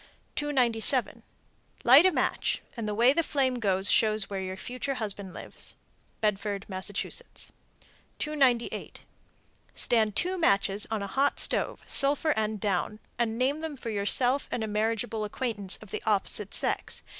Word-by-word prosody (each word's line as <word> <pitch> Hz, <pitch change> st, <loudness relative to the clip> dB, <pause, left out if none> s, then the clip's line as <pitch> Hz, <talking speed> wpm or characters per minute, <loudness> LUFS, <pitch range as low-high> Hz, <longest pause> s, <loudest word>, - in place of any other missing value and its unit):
_ -, -, -40 dB
297. 255 Hz, -3 st, +2 dB, 0.6 s
Light 275 Hz, +9 st, +8 dB
a -, -, +3 dB
match, -, -, 0 dB, 0.2 s
and 230 Hz, -3 st, -4 dB
the 210 Hz, -, -2 dB
way 240 Hz, +4 st, +5 dB
the 335 Hz, -, +2 dB
flame 265 Hz, -5 st, 0 dB
goes 195 Hz, -3 st, +2 dB
shows 215 Hz, -2 st, +2 dB
where 195 Hz, -, -2 dB
your 190 Hz, 0 st, -5 dB
future 255 Hz, +5 st, -4 dB
husband 200 Hz, -4 st, -1 dB
lives. -, -, -9 dB, 0.5 s
Bedford, 205 Hz, -1 st, -1 dB
Mass. 190 Hz, -2 st, -4 dB, 1.3 s
298. 270 Hz, -6 st, 0 dB, 0.7 s
Stand 220 Hz, -3 st, +2 dB
two 365 Hz, +1 st, 0 dB
matches 200 Hz, -, +1 dB
on 220 Hz, -2 st, -2 dB
a -, -, -4 dB
hot 275 Hz, +8 st, +1 dB
stove, -, -, 0 dB
sulphur 285 Hz, +3 st, +2 dB
end 215 Hz, -1 st, -1 dB
down, 200 Hz, +1 st, -1 dB, 0.2 s
and 230 Hz, -1 st, 0 dB
name 275 Hz, +5 st, 0 dB
them 315 Hz, -3 st, -5 dB
for 230 Hz, -, -5 dB
yourself 245 Hz, +6 st, +3 dB
and 230 Hz, -, -2 dB
a -, -, -2 dB
marriageable 220 Hz, +1 st, -1 dB
acquaintance 210 Hz, -3 st, -1 dB
of 205 Hz, -, -15 dB
the -, -, -4 dB
opposite 210 Hz, 0 st, 0 dB
sex. -, -, -2 dB
225 Hz, 150 wpm, -28 LUFS, 205-265 Hz, 1.3 s, Light